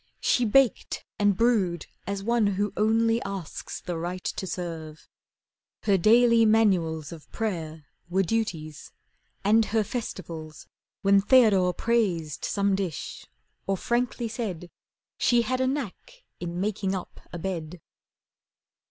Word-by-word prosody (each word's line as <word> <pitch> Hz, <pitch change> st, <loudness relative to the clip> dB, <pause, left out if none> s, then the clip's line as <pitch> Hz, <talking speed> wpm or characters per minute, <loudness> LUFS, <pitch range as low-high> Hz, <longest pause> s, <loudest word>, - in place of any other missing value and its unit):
She 245 Hz, -, +2 dB
baked 255 Hz, +3 st, +2 dB
and 205 Hz, -2 st, +3 dB
brewed 200 Hz, -8 st, +2 dB, 0.2 s
as 200 Hz, 0 st, -3 dB
one 230 Hz, -1 st, +2 dB
who 205 Hz, 0 st, 0 dB
only 225 Hz, +2 st, +2 dB
asks 195 Hz, -4 st, -6 dB
The 175 Hz, -2 st, -4 dB
right 180 Hz, +2 st, -4 dB
to 190 Hz, -, -3 dB
serve. 165 Hz, -4 st, -6 dB, 0.8 s
Her 200 Hz, -, +3 dB
daily 230 Hz, +4 st, +5 dB
manuals 185 Hz, -9 st, +2 dB
Of 165 Hz, -3 st, -11 dB
prayer 160 Hz, -8 st, -4 dB, 0.2 s
were 190 Hz, +2 st, +2 dB
duties, 165 Hz, -8 st, -3 dB, 0.5 s
and 220 Hz, +2 st, +4 dB
her 220 Hz, 0 st, +1 dB
festivals 165 Hz, -9 st, -6 dB, 0.4 s
When 195 Hz, 0 st, +5 dB
Theodore 200 Hz, -6 st, +5 dB
praised 185 Hz, -10 st, 0 dB
some 200 Hz, -1 st, +1 dB
dish, 190 Hz, -5 st, -4 dB, 0.4 s
or 195 Hz, 0 st, +1 dB
frankly 240 Hz, +2 st, -1 dB
said 200 Hz, -7 st, -5 dB, 0.5 s
She 240 Hz, -1 st, +4 dB
had 255 Hz, +3 st, -1 dB
a 260 Hz, -, +2 dB
knack 290 Hz, -, -5 dB, 0.2 s
in 175 Hz, 0 st, -4 dB
making 195 Hz, -1 st, -1 dB
up 185 Hz, -, -7 dB
a 175 Hz, -, -5 dB
bed. 170 Hz, -1 st, -4 dB
195 Hz, 125 wpm, -26 LUFS, 175-225 Hz, 0.8 s, daily